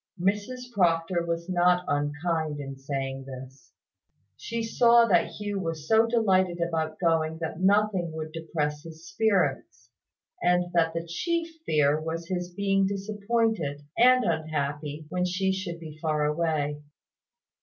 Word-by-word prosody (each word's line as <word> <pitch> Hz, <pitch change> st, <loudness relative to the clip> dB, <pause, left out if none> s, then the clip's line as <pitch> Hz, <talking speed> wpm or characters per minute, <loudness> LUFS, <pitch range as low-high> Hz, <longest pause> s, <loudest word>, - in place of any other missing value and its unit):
Mrs 210 Hz, +7 st, -2 dB
Proctor 170 Hz, -2 st, +2 dB
was 170 Hz, 0 st, -3 dB
not 180 Hz, 0 st, +3 dB
unkind 150 Hz, +1 st, -1 dB
in 135 Hz, -1 st, -6 dB
saying 135 Hz, -1 st, -4 dB
this. 130 Hz, 0 st, -11 dB, 0.6 s
She 230 Hz, -, -4 dB
saw 235 Hz, +1 st, +5 dB
that 180 Hz, -6 st, +3 dB
Hugh 205 Hz, -1 st, -3 dB
was 165 Hz, -4 st, -4 dB
so 225 Hz, +1 st, +5 dB
delighted 190 Hz, -6 st, +2 dB
about 160 Hz, -2 st, -1 dB
going 160 Hz, -2 st, +1 dB
that 160 Hz, 0 st, -5 dB
nothing 195 Hz, -3 st, +2 dB
would 155 Hz, 0 st, -5 dB
depress 155 Hz, -2 st, -3 dB
his 165 Hz, +1 st, -12 dB
spirits, 180 Hz, -, 0 dB, 0.5 s
and 180 Hz, 0 st, +2 dB
that 165 Hz, -1 st, +2 dB
the 165 Hz, 0 st, -2 dB
chief 335 Hz, -, -2 dB, 0.2 s
fear 150 Hz, 0 st, +3 dB
was 165 Hz, +1 st, -5 dB
his 180 Hz, -1 st, -3 dB
being 195 Hz, +1 st, +1 dB
disappointed 200 Hz, -5 st, -1 dB
and 255 Hz, +1 st, +5 dB
unhappy 150 Hz, -2 st, -2 dB
when 180 Hz, +1 st, -1 dB
she 185 Hz, +1 st, 0 dB
should 185 Hz, -3 st, -4 dB
be 155 Hz, -2 st, -10 dB
far 155 Hz, -2 st, +1 dB
away. 150 Hz, -2 st, -1 dB
170 Hz, 135 wpm, -27 LUFS, 155-195 Hz, 0.6 s, saw